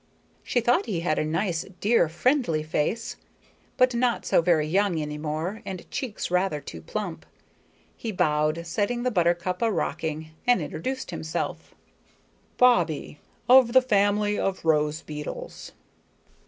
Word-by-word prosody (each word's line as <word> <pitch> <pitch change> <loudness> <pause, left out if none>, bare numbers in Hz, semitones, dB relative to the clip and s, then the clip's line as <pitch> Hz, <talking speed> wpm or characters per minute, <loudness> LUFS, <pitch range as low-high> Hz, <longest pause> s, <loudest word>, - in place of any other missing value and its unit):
She 245 - 0
thought 245 +1 +2
he 185 -7 -2
had 155 -3 0
a - - +1
nice, 165 +2 -1 0.2
dear, 210 -6 +3
friendly 170 - +1
face 160 +10 -2 0.6
but 255 -1 +4
not 240 0 0
so - - +3
very 165 -3 +3
young 185 +1 +1
any 150 0 -4
more 160 +8 -3
and 185 -4 -7
cheeks 235 -8 -4
rather 180 -4 +1
too 85 - -9
plump. 80 0 -5 0.7
He 225 - -5
bowed, 155 -2 +1
setting 220 +7 -1
the 250 - +1
buttercup 175 -1 +1
a 230 -1 +2
rocking, 160 -3 -3 0.2
and 245 0 +5
introduced 260 0 -4
himself: 160 0 -4 0.8
"Bobbie, 170 - +2 0.3
of 250 -2 +7
the 260 - +9
family 205 -2 +2
of 190 -3 -2
rose 150 0 +1
beetles." 150 -1 -7
180 Hz, 140 wpm, -26 LUFS, 155-230 Hz, 0.8 s, the